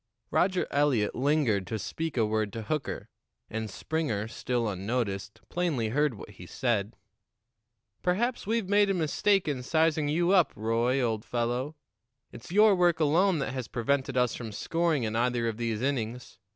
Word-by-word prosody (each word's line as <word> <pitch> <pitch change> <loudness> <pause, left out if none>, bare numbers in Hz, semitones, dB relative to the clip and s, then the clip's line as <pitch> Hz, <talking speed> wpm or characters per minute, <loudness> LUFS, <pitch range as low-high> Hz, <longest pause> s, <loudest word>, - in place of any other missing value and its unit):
Roger 185 0 +2
Eliot 140 -7 +2
lingered 130 -8 +1
to 110 - -2
speak 160 +7 -4
a 115 - +3
word 110 -1 0
to 115 - -5
Hooker, 150 +7 -3 0.4
and 110 0 -3
Springer, 115 -5 -2
still 120 0 -2
unnoticed, 100 0 -3
plainly 155 -11 -1
heard 145 +1 +1
what 105 - -10
he 90 -3 -12
said. 110 -3 -1 1.1
"Perhaps 225 +6 0
we've 225 -2 0
made 205 0 +4
a 195 - +2
mistake 180 +4 +2
in 140 -4 -1
sizing 160 +2 +1
you 170 +4 +2
up, 185 -4 +4
Roy, 115 +4 +1
old 110 -3 -1
fellow. 125 +5 -2 0.6
It's 120 +7 -11
your 210 +2 +6
work 175 -3 +3
alone 165 +4 +3
that 135 -2 -2
has 130 -3 -4
prevented 130 +2 -1
us 125 -2 +2
from 115 -3 -6
scoring 165 +5 0
in 110 0 -2
either 120 0 +1
of 110 -2 -2
these 115 -1 -2
innings. 125 -3 -3
125 Hz, 165 wpm, -28 LUFS, 110-160 Hz, 1.1 s, your